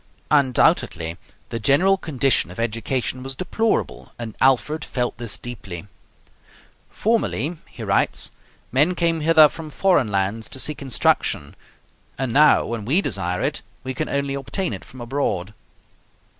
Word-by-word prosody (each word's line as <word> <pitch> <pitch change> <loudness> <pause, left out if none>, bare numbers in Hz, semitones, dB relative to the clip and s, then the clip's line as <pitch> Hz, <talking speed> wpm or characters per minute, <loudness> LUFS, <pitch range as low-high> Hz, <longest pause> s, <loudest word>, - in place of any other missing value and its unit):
Undoubtedly 125 - +2 0.3
the 115 - -3
general 145 - +4
condition 135 - +1
of 90 - -10
education 115 +3 -2
was 135 +1 -3
deplorable, 220 +6 -1
and 115 -3 -6
Alfred 135 +4 +3
felt 125 -1 -2
this 115 -4 -2
deeply. 100 -8 -7 1.0
"Formerly," 200 -7 0
he - - -9
writes, - - +1 0.4
"men 150 +8 +3
came 165 -1 +1
hither 155 0 +7
from 155 +1 -9
foreign 175 - +2
lands 100 +2 -1
to - - -8
seek 150 +4 +1
instruction, 120 - 0 0.6
and 130 -3 -2
now 150 +2 +6
when 115 -2 -4
we 140 - +3
desire 95 - -1
it, - - -1 0.2
we 130 0 -3
can 155 +4 -3
only 140 0 -1
obtain 140 - -3
it 95 - -7
from 130 - -12
abroad." 120 -7 -2
130 Hz, 140 wpm, -22 LUFS, 115-155 Hz, 1.0 s, hither